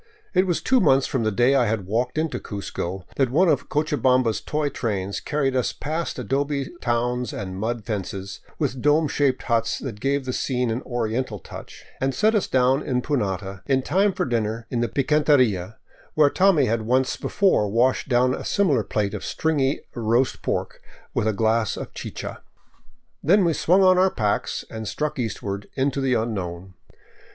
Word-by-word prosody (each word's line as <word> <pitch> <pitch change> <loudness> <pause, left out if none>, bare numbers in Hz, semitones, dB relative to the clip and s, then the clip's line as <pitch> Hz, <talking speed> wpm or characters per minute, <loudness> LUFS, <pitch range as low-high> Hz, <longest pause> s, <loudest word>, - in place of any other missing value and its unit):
It 185 0 +3
was 175 - -1
two 260 -1 +4
months 135 - +4
from 130 - -1
the 110 - +1
day 120 +6 +3
I 130 -4 +3
had 105 -3 -1
walked 120 +8 -1
into 160 -1 -1
Cuzco 95 -2 -5
that 135 -3 +2
one 170 +9 +3
of - - +1
Cochabamba's 130 -6 +1
toy 150 -1 -1
trains 100 -7 -3
carried 140 -3 -1
us 125 - 0
past 160 +3 -3
adobe 135 +3 -1
towns 120 +1 0
and 95 -2 -5
mud 110 +2 -3
fences, 100 -3 -4 0.2
with 135 -4 -2
dome 150 +2 +3
shaped 140 -2 0
huts 115 -2 0
that 115 -7 -6
gave 135 +2 0
the 130 - -3
scene 125 -3 -1
an 115 +3 -2
oriental 120 -1 -2
touch, 90 - -11
and 135 0 0
set 215 +1 +3
us 210 -5 +1
down 130 +2 +3
in 125 -4 -1
Punata 95 - -2
in 135 -1 +2
time 195 +9 +2
for - - -2
dinner 115 -2 -2
in 120 - -1
the 120 - 0
picanteria 130 - +2 0.4
where 150 -2 +5
Tommy 185 -7 +4
had 115 -1 0
once 130 +4 +1
before 185 - +1
washed 125 +6 +1
down 125 0 +3
a - - -5
similar 155 - +2
plate 105 -2 -1
of - - -5
stringy 145 -4 0
roast 120 +2 +1
pork - - -3 0.3
with 110 - 0
a - - +3
glass 110 +1 +1
of - - -7
chicha. - - -7 0.8
Then 190 +5 +4
we 165 - +2
swung 185 +5 +3
on 185 -1 +5
our 190 +1 +5
packs 105 - -1
and 110 -1 -6
struck 150 +4 -3
eastward 100 -3 -4
into 135 +1 0
the 130 -2 +2
unknown. 95 -5 -3
125 Hz, 180 wpm, -23 LUFS, 110-145 Hz, 0.8 s, where